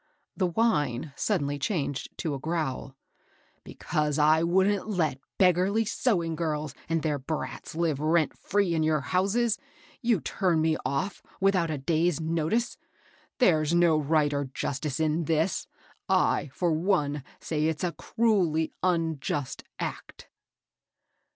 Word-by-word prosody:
The 185 - +1
whine 150 - 0
suddenly 145 0 -1
changed 145 -3 -2
to 155 - -2
a 140 - -4
growl. 150 -4 -3 0.7
"Because 150 -1 -2
I 155 +1 +5
wouldn't 190 +4 +2
let 160 -9 0 0.2
beggarly 190 +4 +3
sewing 175 -9 0
girls 155 -3 -2 0.2
and 165 -1 0
their 150 -3 0
brats 155 +3 -5
live 160 -4 0
rent 155 +1 +2
free 200 -3 0
in 160 - +1
your 155 -2 +2
houses, 205 +8 +1 0.4
you 235 -5 +2
turn 175 0 0
me 160 0 +2
off 170 +9 -2 0.2
without 190 -4 +2
a 155 - -2
day's 165 +3 +1
notice 165 +9 -1
I - - -38 0.5
There's 160 - +3
no 170 -2 +5
right 150 0 +2
or 140 0 -1
justice 135 +2 -3
in 155 -1 +1
all - - -1
this. 160 +4 0 0.4
I^ 140 - +2
for 175 +4 0
one, 155 -4 +1 0.2
say 155 -1 -1
it's 160 0 -2
a 175 - +1
cruelly 175 -5 +1
unjust 160 -6 -1
act." - - -6
160 Hz, 140 wpm, -27 LUFS, 150-180 Hz, 0.7 s, I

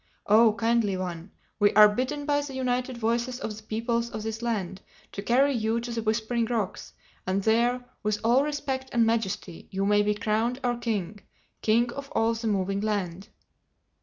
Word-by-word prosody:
Oh 220 +1 +6
Kindly 225 -3 +1
One, 175 -1 -5 0.3
we 205 -1 +5
are 210 0 +9
bidden 255 +7 -2
by 290 -1 +2
the 280 -2 -7
united 255 -1 -1
voices 235 +2 -1
of 215 -5 -4
the 220 - -11
peoples 230 +2 -2
of 215 -1 -6
this 220 +1 -4
land 205 -6 -2 0.3
to 200 - -5
carry 265 +6 +3
you 225 -1 0
to 235 +1 -6
the 230 -1 -2
Whispering 225 +2 0
Rocks, 220 -5 -3 0.3
that 190 +1 0
there, 240 +3 +2 0.2
with 210 0 0
all 240 +4 +4
respect 280 -3 -3
and 235 -1 +4
majesty, 205 -6 -2
you 195 +1 -1
may 205 0 +4
be 210 0 +1
crowned 225 +4 0
our 245 -1 +1
king—King 220 +1 -2
of 280 0 -7
all 225 +1 +2
the 225 0 -4
Moving 195 -1 0
Land." 200 -3 -2
225 Hz, 175 wpm, -27 LUFS, 210-240 Hz, 0.3 s, are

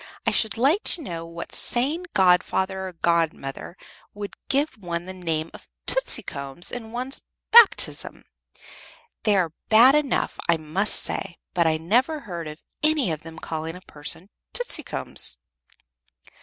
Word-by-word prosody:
I - - +3
should 220 0 +1
like 285 - +3
to 345 - +6
know 165 -7 -6
what 170 0 -8
sane 295 +9 +1
godfather 190 +1 +2
or 185 - -8
godmother 165 -2 -1 0.4
would 205 -1 -7
give 280 -3 0
one 175 -2 -4
the 185 - -7
name 165 -3 -3
of - - -14 0.2
'Tootsicums' 145 - -1
in 225 -2 -7
one's 255 +3 -3 0.3
baptism. 465 -2 +5 1.0
They 210 -2 +4
are 175 -5 +1 0.2
bad 235 +5 +7
enough, 300 -3 0
I 170 - +4
must 160 +7 0
say; 180 -3 -3 0.2
but 170 -2 +2
I 160 0 +2
never 250 - +1
heard 170 - -6
of 150 +1 -10 0.2
any 305 - +2
of 155 -1 -4
them 165 0 -11
calling 160 0 -5
a 180 - -11
person 160 +4 -4 0.2
'Tootsicums.'" - - 0
185 Hz, 140 wpm, -24 LUFS, 165-250 Hz, 1.0 s, bad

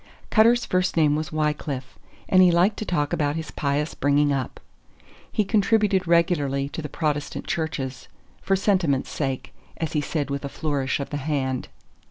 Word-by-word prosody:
Cutter's 235 +2 +5
first 185 -1 0
name 150 -2 +4
was 155 +1 -3
Wycliffe, 150 -4 -2 0.3
and 185 - +5
he 180 - +7
liked 175 +5 +3
to 215 - -4
talk 150 -6 -1
about 145 -1 0
his 160 -2 -5
pious 145 +2 -1
bringing 145 0 +2
up. 130 -3 -3 0.7
He 215 - +1
contributed 205 -3 +2
regularly 150 -5 +2
to 160 - -5
the 150 - -6
Protestant 150 -1 -2
churches, 140 -7 -3 0.3
"for 195 - +1
sentiment's 185 -9 +1
sake," 135 -3 -3 0.2
as 160 - -3
he 150 - +1
said 145 -1 -2
with 140 0 -3
a 140 - -4
flourish 140 -3 -1
of 140 - -5
the 145 - -2
hand. 135 -3 -2
150 Hz, 170 wpm, -24 LUFS, 140-180 Hz, 0.7 s, he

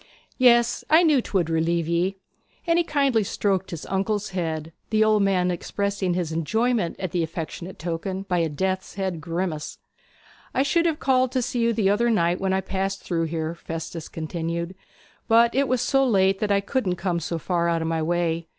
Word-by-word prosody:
'Yes, 240 -2 +4
I 320 +3 +6
knew 300 -6 +4
'twould 185 -7 0
relieve 165 0 0
ye.' 175 +3 0 0.5
And 335 0 +3
he - - +3
kindly 275 -8 +2
stroked 195 -1 -1
his 165 -3 -6
uncle's 205 +2 -1
head, 165 -4 -3 0.2
the 215 0 +3
old 215 -1 +3
man 185 -2 +2
expressing 195 +1 -2
his 175 -3 -2
enjoyment 210 +4 0
at 185 -2 -3
the 175 -1 0
affectionate 165 +2 -5
token 180 +3 -3
by 180 -3 0
a 165 -1 +1
death's 190 +5 -2
head 190 -4 -3
grimace. 165 -2 -3 0.8
'I 265 - +3
should 335 +4 +2
have 315 -2 -1
called 255 -2 +2
to 255 -2 +1
see 245 - -2
you 230 0 +3
the 210 -3 +2
other 235 +4 +2
night 175 -5 +1
when 190 0 0
I 190 0 +1
passed 195 +1 -3
through 165 -2 -1
here,' 160 0 -3
Festus 165 -1 -6
continued; 170 +2 -4 0.5
'but 235 +1 +5
it 275 +1 +2
was 255 -1 +1
so 270 +2 +2
late 195 -5 +3
that 210 -1 0
I 200 0 +3
couldn't 200 -4 -1
come 175 -1 -1
so 170 +1 -3
far 170 0 0
out 165 -1 0
of - - -2
my 165 0 0
way. 170 0 0
190 Hz, 195 wpm, -24 LUFS, 170-220 Hz, 0.8 s, I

